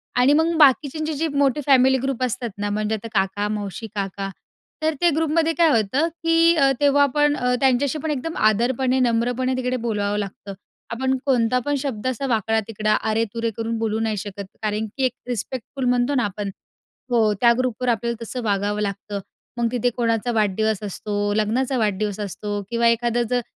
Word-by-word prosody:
आणि 250 +4 +4
मग 325 +2 +3
बाकीच्यांचे 305 +2 +3
जे 320 +3 -1
मोठे 285 0 +1
फॅमिली 265 -1 +5
ग्रुप 270 -2 -1
असतात 250 -1 -2
ना, 205 0 -2
म्हणजे 215 +1 -1
आता 230 +2 -7
काका, 195 +2 -1
मावशी, 210 +1 -4
काका, 195 0 -3 0.5
तर 315 0 +2
ते 345 - +5
ग्रुपमध्ये 325 +1 +1
काय 335 -2 +5
होतं 260 +10 +1 0.2
की 330 +1 +4
अ, 275 -3 +4
तेव्हा 285 0 +4
आपण 295 +1 +2
अ, 250 -2 0
त्यांच्याशी 270 +2 +2
पण 315 - -1
एकदम 300 +4 -3
आदरपणे, 250 +4 +2
नम्रपणे 245 +2 +1
तिकडे 250 0 -1
बोलवावं 205 -1 -1
लागतं. 200 0 -6 0.4
आपण 260 +3 0
कोणता 250 -2 +2
पण 290 - +1
शब्द 255 -5 -4
असा 255 +1 -2
वाकडा-तिकडा, 220 -1 0
अरे-तुरे 225 +1 -1
करून 225 0 -2
बोलू 220 -1 -1
नाही 220 -2 -1
शकत, 200 0 -6 0.2
कारण 215 +1 -1
की 270 - -1
एक 255 - +1 0.2
रिस्पेक्टफुल 250 +3 -4
म्हणतो 250 +3 +1
ना 245 - +2
आपण 200 0 -4 0.6
हो, 220 -3 +3
त्या 235 -1 +6
ग्रुपवर 250 -1 -1
आपल्याला 235 0 -1
तसं 250 +3 -5
वागावं 205 0 0
लागतं. 200 0 -3 0.4
मग 235 -1 0
तिथे 245 0 +1
कोणाचा 230 0 0
वाढदिवस 215 -1 +1
असतो, 205 +1 -2
लग्नाचा 240 +5 0
वाढदिवस 210 -1 -1
असतो 205 0 -4
किंवा 235 0 +2
एखादं 235 +1 +2
जर 245 0 +1
235 Hz, 175 wpm, -22 LUFS, 210-265 Hz, 0.6 s, त्या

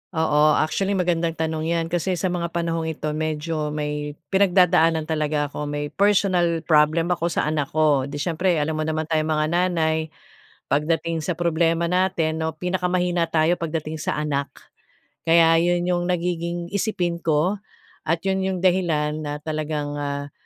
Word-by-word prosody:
Oo, 155 -1 +3
actually 195 +6 0
magandang 170 -3 0
tanong 160 0 -2
'yan 165 -1 0
kasi 175 +2 0
sa 180 +1 -1
mga 170 -1 -2
panahong 165 -1 -1
ito 155 -1 -3
medyo 155 0 -2
may 150 -1 -3 0.2
pinagdadaanan 180 -4 +4
talaga 150 -2 -1
ako, 150 0 -4
may 145 0 -4
personal 185 -5 +2
problem 160 +2 +3
ako 170 -1 0
sa 170 - -1
anak 150 -2 -1
ko, 150 -4 +3
di 140 - -7
siyempre 170 +4 0
alam 155 +1 -1
mo 155 - -1
naman 155 0 -1
tayong 155 0 0
mga 155 - +1
nanay 165 -3 +1 0.6
pagdating 160 +3 0
sa 160 +2 -3
problema 165 0 +1
natin, 175 -4 +1
'no, 160 -1 -2
pinakamahina 180 -1 0
tayo 160 +1 +2
pagdating 160 -1 -3
sa - - -2
anak. 145 -2 -1 0.8
Kaya 165 0 +5
'yun 175 +1 +1
'yung 175 0 0
nagiging 175 -1 -2
isipin 180 -5 -1
ko 165 +5 +1 0.5
at 165 +2 0
'yun 190 0 0
'yung 190 0 -1
dahilan 160 -5 +1
na 150 -1 -5
talagang, 150 -2 -3
ah, 140 0 -4
165 Hz, 155 wpm, -23 LUFS, 155-175 Hz, 0.8 s, Kaya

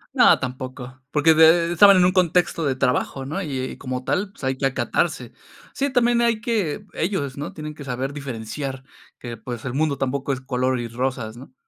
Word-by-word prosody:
No, - - +6
tampoco. 130 0 -7
Porque 155 +2 +4
de 165 +2 +5
estaban 200 +2 +7
en 180 - +5
un 185 - +4
contexto 175 -2 +2
de 135 -2 +1
trabajo, 135 +1 -1
¿no? 155 +8 -3
Y 140 -7 -4
y - - -13
como 130 -1 -5
tal, 190 +9 -1
pues, 200 - -17
hay 130 0 0
que 135 - +2
acatarse. 135 - -1 0.4
Sí, 280 0 -1
también 240 -1 +3
hay 235 -2 +2
que 215 -10 -2
ellos, 155 -7 -2
¿no? 145 +1 -6
Tienen 155 -1 -7
que 150 - -10
saber 130 +1 -3
diferenciar 135 0 -5 0.3
que, 120 -2 -7
pues, 120 0 -7
el 130 - -3
mundo 150 -1 0
tampoco 135 +1 -2
es 135 - -2
color 130 -1 -1
y 120 - -4
rosas, 120 -2 -3
¿no? 130 +1 -13
140 Hz, 200 wpm, -22 LUFS, 130-165 Hz, 0.4 s, estaban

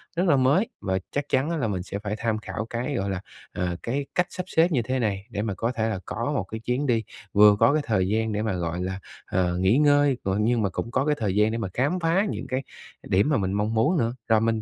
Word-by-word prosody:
rất 180 +3 +1
là 145 - +5
mới 140 - +3
và 95 -1 0
chắc 145 - -1
chắn 135 +4 +1
á 170 - -1
là 125 -7 0
mình 95 -4 -2
sẽ 100 +1 -5
phải 105 0 -3
tham 115 -1 0
khảo 110 0 -5
cái, 125 +5 -3
gọi 100 -3 -1
là, 95 -2 -3 0.3
à, 90 -1 -2
cái 140 +4 -2
cách 180 0 +2
sắp 180 - -5
xếp 170 0 +3
như 135 -6 +2
thế 130 +3 -2
này 100 -4 -1
để 100 - -3
mà 105 -2 -2
có 115 +5 -1
thể 110 -3 -1
là 105 -4 -2
có 120 +6 -3
một 110 - 0
cái 110 +4 -7
chuyến 125 +5 -1
đi, 115 -3 +2 0.3
vừa 105 0 +7
có 140 - +5
cái 155 - +2
thời 95 -5 +1
gian 110 +2 0
để 105 - -1
mà, 110 -2 -1
gọi 85 -1 -2
là, 95 +1 -3 0.3
ờ, 90 -1 0
nghỉ 95 +6 +3
ngơi, 145 -2 +4
g - - -2
nhưng 115 +2 +2
mà 100 - +1
cũng 115 +5 -4
có 130 +3 +1
cái 150 0 +2
thời 100 -4 -1
gian 105 +1 +3
để 115 - -2
mà 115 -4 -2
khám 145 +9 0
phá 170 +4 +2
những - - -4
cái 130 +1 -2 0.4
điểm 100 +9 +2
mà 145 - +3
mình 95 -2 -1
mong 105 +2 0
muốn 140 +11 +2
nữa, 115 -4 +1
rồi 110 -1 +4
mình 115 -1 +1
115 Hz, 280 wpm, -25 LUFS, 100-135 Hz, 0.4 s, vừa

